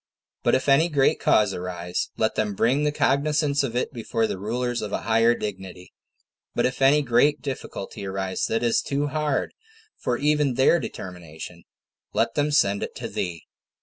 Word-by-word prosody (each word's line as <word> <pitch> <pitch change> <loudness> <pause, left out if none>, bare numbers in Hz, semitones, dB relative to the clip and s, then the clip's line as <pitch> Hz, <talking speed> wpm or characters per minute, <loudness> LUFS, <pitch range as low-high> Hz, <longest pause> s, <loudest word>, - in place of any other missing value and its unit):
But - - +3
if 130 - -1
any 145 +5 +5
great 140 -4 +2
cause 105 -2 +3
arise, 90 -1 -3
let 110 0 +1
them 105 -2 -1
bring 130 +8 +2
the 150 - +2
cognizance 145 +1 +1
of 125 -4 -3
it 125 - -1
before 115 -1 -1
the 95 - -3
rulers 120 +4 -2
of 105 - -5
a - - -2
higher 115 +1 +3
dignity; 95 -4 -7 0.6
but - - +2
if 125 +1 -2
any 145 +3 +5
great 140 +4 +2
difficulty 100 -7 -6
arise 95 -1 -2
that 115 +1 -1
is 120 -1 +2
too 145 +1 -1
hard 150 -1 -1 0.5
for 120 - -1
even 150 -2 +1
their 135 +6 +4
determination, 85 - -8 0.5
let - - +1
them 145 0 +1
send 100 -8 +3
it - - -5
to - - -5
thee. 85 -3 -4
120 Hz, 175 wpm, -24 LUFS, 95-140 Hz, 0.6 s, any